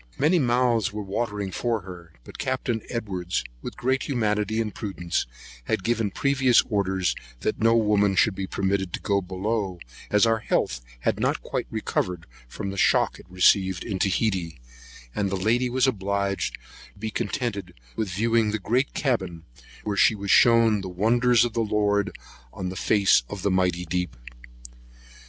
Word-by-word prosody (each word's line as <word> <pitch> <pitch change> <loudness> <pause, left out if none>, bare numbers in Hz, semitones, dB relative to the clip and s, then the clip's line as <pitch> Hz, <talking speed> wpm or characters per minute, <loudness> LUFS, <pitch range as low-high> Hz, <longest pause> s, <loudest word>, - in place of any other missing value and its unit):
Many 160 +5 +3
mouths 120 -5 +2
were 105 0 -5
watering 100 -1 -3
for 115 +2 -1
her; 85 -3 -11
but - - -12
Capt. 130 -1 -1 0.2
Edwards, 95 -7 -2 0.2
with - - -7
great 130 +2 0
humanity 110 -4 0
and 110 -2 -2
prudence, 90 - -3 0.4
had 95 - -1
given 115 -1 0
previous 135 +2 +3
orders, 95 -3 +1 0.3
that 110 - -2
no 115 +1 +4
woman 105 -3 +3
should 105 +3 +4
be 95 0 -4
permitted 95 -2 -1
to - - -2
go 100 -1 0
below, 95 +1 -2 0.3
as 105 +1 +4
our 115 -1 +2
health 60 - -1 0.2
had - - 0
not - - 0
quite - - -3
recovered 90 -2 -2 0.2
the 100 - -5
shock - - +2
it - - -15
received 95 0 +3
at 115 - -6
Otaheite; 95 - 0 0.5
and 100 +5 -1
the 95 - -1
lady 120 +6 +1
was 130 +1 +2
obliged 100 -4 -1 0.4
to - - -21
be 110 +1 -4
contented 100 -8 -3 0.2
with 110 -3 -2
viewing 115 +3 +1
the 110 - -1
great 125 +6 0
cabin, 95 - -1 0.4
where 105 -1 -2
she 110 - +5
was 100 -1 -2
shewn 115 -3 +5
the 95 - -6
wonders 120 +6 +3
of 120 - -4
the 115 - 0
Lord 105 -2 +1 0.4
on 90 - -5
the 95 - -6
face 100 - +4
of 100 -3 -6
the 100 - +2
mighty 90 -1 +1
deep. 90 -6 -3
105 Hz, 165 wpm, -25 LUFS, 95-115 Hz, 0.5 s, she